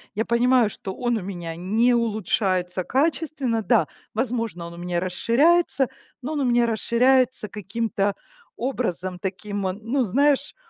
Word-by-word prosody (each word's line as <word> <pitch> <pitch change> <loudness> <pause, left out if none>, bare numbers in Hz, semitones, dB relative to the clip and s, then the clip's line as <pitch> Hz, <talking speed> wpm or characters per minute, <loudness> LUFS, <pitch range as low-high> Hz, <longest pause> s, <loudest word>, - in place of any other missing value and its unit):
Я 220 - +1
понимаю, 240 -1 +3
что 190 -1 -7
он 240 -2 0
у - - -4
меня 175 -3 -6
не 220 +7 +2
улучшается 190 -5 0
качественно. 280 -4 0
Да, 235 +1 +3 0.3
возможно, 225 -7 -2
он 170 - -10
у - - -13
меня 175 0 -2
расширяется, 270 - +2 0.3
но 295 +5 -4
он 295 - -1
у 270 - +1
меня 240 -1 +3
расширяется 245 0 +2
каким-то 205 0 -2 0.4
образом 185 -8 -3
таким, 195 +1 -3
э, 185 - -1
ну, 230 +6 -1
знаешь, 280 +6 +2
225 Hz, 145 wpm, -24 LUFS, 190-250 Hz, 0.4 s, понимаю